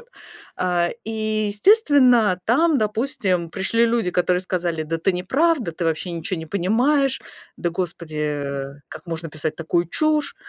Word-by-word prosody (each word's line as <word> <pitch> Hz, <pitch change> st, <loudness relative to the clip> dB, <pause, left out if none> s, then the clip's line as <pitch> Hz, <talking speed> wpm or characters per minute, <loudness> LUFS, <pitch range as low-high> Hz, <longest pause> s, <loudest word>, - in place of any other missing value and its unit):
Вот, 475 Hz, -, -21 dB, 0.5 s
а, 175 Hz, -1 st, +1 dB, 0.2 s
и, 215 Hz, -1 st, -1 dB
естественно, 250 Hz, -, +4 dB
там, 295 Hz, +5 st, +3 dB
допустим, 210 Hz, -6 st, -1 dB
пришли 220 Hz, +5 st, +1 dB
люди, 230 Hz, -5 st, 0 dB
которые 180 Hz, 0 st, +1 dB
сказали: 175 Hz, -3 st, -2 dB
"Да 165 Hz, +2 st, -2 dB
ты 190 Hz, +4 st, +1 dB
не 180 Hz, 0 st, -3 dB
правда, 275 Hz, -, +1 dB
ты 170 Hz, +1 st, -4 dB
вообще 165 Hz, +2 st, -1 dB
ничего 170 Hz, +2 st, -3 dB
не 160 Hz, -, -7 dB
понимаешь, 250 Hz, -, +1 dB, 0.4 s
да, 175 Hz, -, -1 dB
господи, 155 Hz, -4 st, -3 dB, 0.5 s
как -, -, -10 dB
можно 165 Hz, 0 st, -5 dB
писать 155 Hz, 0 st, -2 dB
такую 170 Hz, +1 st, 0 dB
чушь?" 305 Hz, -, +1 dB
185 Hz, 150 wpm, -22 LUFS, 170-240 Hz, 0.5 s, естественно